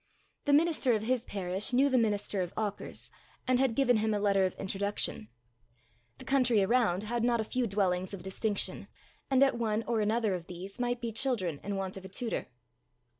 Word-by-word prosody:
The 290 - +3
minister 300 -4 +3
of 215 -1 0
his 250 +1 0
parish 190 +3 -3
knew 265 +3 +5
the 265 - +1
minister 205 -4 +1
of 175 -1 -4
Auchars, 210 -2 -3 0.4
and 255 -1 +3
had 260 -4 +2
given 245 -3 +4
him 215 0 +1
a - - 0
letter 200 -2 +3
of 185 - -2
introduction. 195 - -2 0.9
The - - -12
country 250 -6 +3
around 210 -4 +2
had 235 +2 -2
not 240 -1 +2
a - - +1
few 245 +2 -1
dwellings 190 -3 0
of 200 -3 -7
distinction, 200 +2 -2 0.4
and 265 0 +5
at 270 -3 +2
one 220 -1 0
or 230 -2 0
another 215 -1 +1
of 175 -2 -5
these 185 +4 -8
might 245 0 -1
be 235 -1 -3
children 215 - 0
in 205 0 -3
want 190 0 -3
of 190 - -9
a - - -8
tutor. 230 +4 -2
215 Hz, 195 wpm, -30 LUFS, 195-245 Hz, 0.9 s, knew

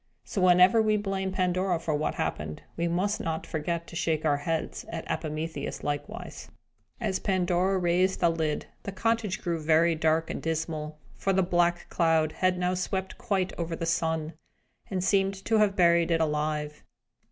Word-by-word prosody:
So, 195 - -3
whenever 180 +4 +6
we 215 -1 +2
blame 195 -2 -2
Pandora 185 -1 +1
for 165 -1 -2
what 150 +1 -1
happened, 75 0 -3
we 170 +1 0
must 185 +5 0
not 160 -1 -3
forget 170 +2 -3
to 170 - -11
shake 160 -1 0
our 145 -2 +3
heads 160 +2 -3
at 165 -1 -5
Epimetheus 155 -1 -4
likewise. 145 +10 -5 0.5
As 205 -6 -1
Pandora 185 0 +1
raised 180 +1 +2
the 170 - +4
lid, 160 -2 -1 0.2
the 200 - -5
cottage 220 0 -1
grew 170 -2 -1
very 165 +2 +4
dark 160 0 +1
and - - -5
dismal; 155 -1 -3 0.2
for 195 - +1
the 190 0 +3
black 175 -1 +1
cloud 160 -2 +2
had 185 +1 +1
now 180 0 0
swept 190 +1 -3
quite 195 -5 -1
over 170 -1 -2
the 165 - -3
sun, 160 -1 0 0.6
and 185 -2 -1
seemed 195 0 +2
to 225 -1 +3
have 205 -2 +3
buried 170 -2 +4
it 165 -1 +2
alive. 150 -1 -1
170 Hz, 170 wpm, -28 LUFS, 160-190 Hz, 0.6 s, whenever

